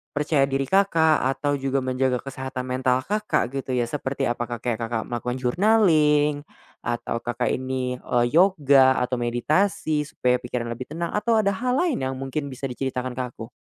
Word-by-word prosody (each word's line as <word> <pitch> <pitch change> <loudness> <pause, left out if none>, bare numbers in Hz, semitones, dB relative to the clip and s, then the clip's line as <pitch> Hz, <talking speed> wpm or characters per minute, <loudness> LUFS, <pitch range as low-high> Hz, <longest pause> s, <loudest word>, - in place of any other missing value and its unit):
percaya 145 -1 +2
diri 135 0 0
Kakak, 160 -3 +3
atau 145 -1 -1
juga 135 0 -1
menjaga 130 -1 0
kesehatan 130 -1 -5
mental 130 0 0
Kakak, 210 - -1
gitu 135 -1 -3
ya. 125 - +2
Seperti 135 +2 -3
apakah 120 -1 -5
kayak 120 -2 -1
Kakak 115 -1 -2
melakukan 120 +1 -2
journaling, 150 - +3 0.3
atau 120 0 -3
Kakak 120 +1 -2
ini, 130 -1 -2
eee, 120 -1 +1
yoga, 145 -7 +5
atau 125 0 -2
meditasi, 150 +5 0
supaya 125 -4 0
pikiran 120 -1 -4
lebih 120 +2 -6
tenang, 170 0 -3
atau 225 +2 +1
ada 210 -2 +3
hal 250 +6 -1
lain 340 -1 +1
yang 130 0 -2
mungkin 135 +2 -4
bisa 130 -1 -10
diceritakan 130 -1 -3
ke 125 0 -3
aku? 115 -1 -10
130 Hz, 165 wpm, -24 LUFS, 125-150 Hz, 0.3 s, yoga